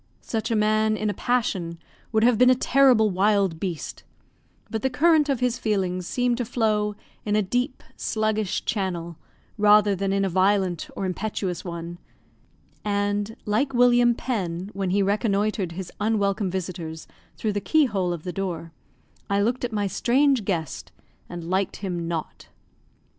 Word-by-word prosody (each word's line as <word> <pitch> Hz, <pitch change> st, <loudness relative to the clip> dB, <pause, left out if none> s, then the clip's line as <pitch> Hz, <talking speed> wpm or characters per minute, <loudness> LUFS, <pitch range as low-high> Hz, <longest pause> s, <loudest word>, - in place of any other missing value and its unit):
Such 225 Hz, -2 st, -2 dB
a 230 Hz, -, +1 dB
man 215 Hz, 0 st, +2 dB
in 215 Hz, -1 st, 0 dB
a -, -, -5 dB
passion 190 Hz, -10 st, -1 dB, 0.3 s
would 220 Hz, -1 st, +2 dB
have 235 Hz, -2 st, +4 dB
been 250 Hz, 0 st, +7 dB
a 255 Hz, -, +6 dB
terrible 250 Hz, -5 st, +4 dB
wild 195 Hz, -3 st, +2 dB
beast; 175 Hz, -4 st, -5 dB, 0.6 s
but 220 Hz, -2 st, -3 dB
the 265 Hz, -, +1 dB
current 300 Hz, +2 st, +3 dB
of 265 Hz, -3 st, 0 dB
his 250 Hz, -1 st, 0 dB
feelings 185 Hz, -4 st, -1 dB
seemed 245 Hz, -1 st, 0 dB
to -, -, +1 dB
flow 215 Hz, -3 st, 0 dB, 0.3 s
in 210 Hz, 0 st, 0 dB
a 215 Hz, -, +3 dB
deep, 245 Hz, +8 st, -2 dB
sluggish 215 Hz, -2 st, -1 dB
channel, 175 Hz, -6 st, -2 dB, 0.4 s
rather 210 Hz, -1 st, +5 dB
than 195 Hz, +1 st, -1 dB
in 195 Hz, 0 st, +1 dB
a -, -, +1 dB
violent 190 Hz, -1 st, +1 dB
or 195 Hz, -, -3 dB
impetuous 190 Hz, -1 st, -3 dB
one; 170 Hz, -1 st, -6 dB, 0.8 s
and, 205 Hz, +1 st, -1 dB
like 245 Hz, +6 st, 0 dB
William 245 Hz, -1 st, +5 dB
Penn, 190 Hz, -7 st, -3 dB
when 195 Hz, -1 st, -2 dB
he 200 Hz, +2 st, +2 dB
reconnoitred 205 Hz, -2 st, 0 dB
his 185 Hz, 0 st, -6 dB
unwelcome 205 Hz, -2 st, +1 dB
visitors 175 Hz, -3 st, -5 dB, 0.3 s
through 215 Hz, -2 st, -1 dB
the 205 Hz, -, -2 dB
keyhole 205 Hz, -, +2 dB
of 170 Hz, -3 st, -5 dB
the 180 Hz, -, -5 dB
door, 175 Hz, -4 st, -4 dB, 0.6 s
I 200 Hz, 0 st, +2 dB
looked 240 Hz, +4 st, -1 dB
at 245 Hz, -, -1 dB
my 205 Hz, -2 st, -1 dB
strange 255 Hz, +3 st, +2 dB
guest, 165 Hz, -7 st, -3 dB, 0.4 s
and 175 Hz, -1 st, -6 dB
liked 190 Hz, +2 st, 0 dB
him 175 Hz, -4 st, -4 dB
not. 165 Hz, -2 st, -5 dB
205 Hz, 160 wpm, -24 LUFS, 185-225 Hz, 0.8 s, been